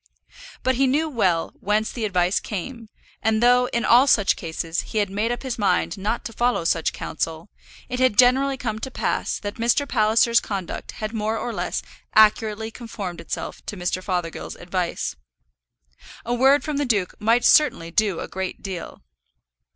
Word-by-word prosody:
But 260 - +2
he 270 0 +3
knew 300 +5 +1
well 185 - 0
whence 210 +2 0
the 230 -3 -3
advice 180 -2 +1
came; 225 +3 -6 0.3
and 220 -1 +2
though, 250 +1 +5
in 235 -2 -1
all 250 +4 +6
such 205 -7 +4
cases, 165 0 -3
he 220 - -6
had 205 -2 +1
made 215 +4 0
up 240 - -4
his 255 -3 -4
mind 205 - +1
not 215 +3 -3
to 230 - -6
follow 240 -4 +1
such 165 0 +1
counsel, 165 +3 -4 0.4
it 250 -1 -4
had 255 -5 +3
generally 265 +2 +4
come 220 -4 -3
to 265 - -5
pass - - -1
that 205 0 -6
Mr. 240 +5 +2
Palliser's 230 0 +3
conduct 195 -4 -5
had 215 +1 -5
more 220 0 -1
or 235 - -4
less - - -3 0.3
accurately 220 0 +3
conformed 210 -7 -7
itself - - -6
to 205 - -5
Mr. 180 +1 -2
Fothergill's 180 -4 -3
advice. 175 - -3 1.1
A 240 - -1
word 265 +3 +4
from 300 -2 -3
the 290 - 0
duke 205 -7 0
might 230 +3 +3
certainly 170 - +4
do 200 -2 +1
a - - -5
great 190 0 -5
deal! 190 -4 -7
220 Hz, 175 wpm, -23 LUFS, 190-245 Hz, 1.1 s, all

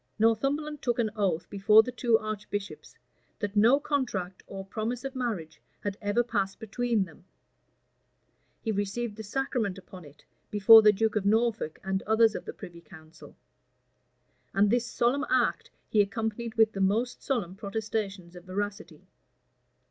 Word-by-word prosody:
Northumberland 275 +7 +1
took 240 -2 0
an 225 -3 0
oath 185 -5 0
before 210 +2 +6
the 250 - -5
two 240 -2 +2
archbishops, 210 -2 -6 0.4
that 205 -1 -4
no 230 +7 +5
contract 215 -12 -2
or 195 0 -7
promise 225 +5 -4
of 270 0 -5
marriage 185 -12 -4 0.2
had 205 -1 -3
ever 205 +3 +1
passed 195 -4 -2
between 230 0 0
them: 175 0 -17 1.4
he 225 - -1
received 205 +2 -2
the 220 - -7
sacrament 220 -3 -2
upon 185 -1 -12
it, 145 0 -17 0.2
before 215 +2 +8
the 210 -1 +6
duke 220 +2 0
of 210 - +1
Norfolk 225 -6 +1
and 190 0 -1
others 220 0 +4
of - - -6
the - - -6
privy 175 -4 -11
council; 160 -1 -15 1.2
and 200 +1 +4
this 240 0 +1
solemn 245 +4 0
act 250 -3 +1 0.2
he 215 - +3
accompanied 220 +3 -3
with 220 -2 +4
the 195 - -4
most 220 +6 0
solemn 225 -10 -2
protestations 200 -3 -4
of 175 0 -12
veracity. 205 +3 -5
215 Hz, 150 wpm, -28 LUFS, 195-235 Hz, 1.4 s, before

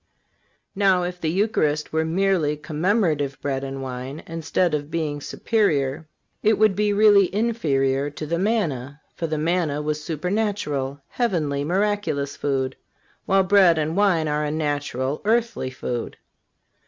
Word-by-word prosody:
Now, 190 -2 +3
if 180 0 -5
the 160 - 0
Eucharist 155 -6 0
were 160 0 +2
merely 165 -3 +1
commemorative 155 -2 0
bread 135 -1 -2
and 135 0 -5
wine, 130 +3 -6
instead 165 +1 -1
of 145 -1 -2
being 155 -3 -2
superior, 155 - 0 0.3
it 215 0 +3
would 215 -2 +4
be 210 +1 +1
really 205 -2 +5
inferior 145 - +1
to 155 +1 -7
the 170 +3 -1
manna; 150 - -1
for 165 - -3
the 155 0 -2
manna 160 -2 0
was 150 0 -2
supernatural, 155 -6 -2
heavenly, 155 - -1
miraculous 185 -5 -1
food, 135 -2 -1 0.5
while 195 0 +4
bread 185 -3 +5
and 155 +1 -1
wine 185 -6 +3
are 150 0 0
a 150 - -1
natural, 145 -3 -2
earthly 225 - 0
food. 125 -2 -5
160 Hz, 140 wpm, -23 LUFS, 145-195 Hz, 0.5 s, really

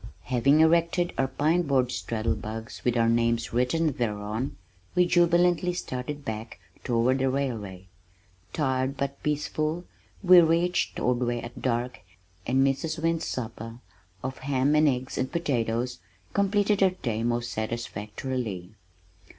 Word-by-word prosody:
Having 135 +5 +3
erected 170 +2 +3
our 135 - +1
pine 155 +6 +1
board 135 -6 +1
straddle 115 -2 -1
bugs 110 +1 -7
with 120 -1 +1
our 115 0 +3
names 115 0 +1
written 135 +7 +1
thereon, 110 0 -3 0.4
we 180 - +5
jubilantly 175 0 +3
started 140 -1 -5
back 110 -3 -5 0.2
toward 120 +2 +2
the 135 0 +2
railway. 110 -9 -3 0.7
Tired 135 -2 -1
but 140 0 -3
peaceful, 155 +3 -1 0.4
we 180 -1 +9
reached 170 +2 +1
Ordway 120 -1 0
at 120 0 -9
dark 125 0 -1 0.5
and 130 +2 +3
Mrs. 155 +4 -1
Wynn's 165 0 0
supper 115 -2 -5 0.5
of 130 0 -4
ham 135 +1 +1
and 150 0 +5
eggs 130 -1 -1
and 130 0 -1
potatoes 125 - -1 0.3
completed 205 +1 +2
our 190 - +6
day 120 -12 -3
most 120 0 -1
satisfactorily. 110 -2 -4
130 Hz, 130 wpm, -27 LUFS, 115-160 Hz, 0.7 s, we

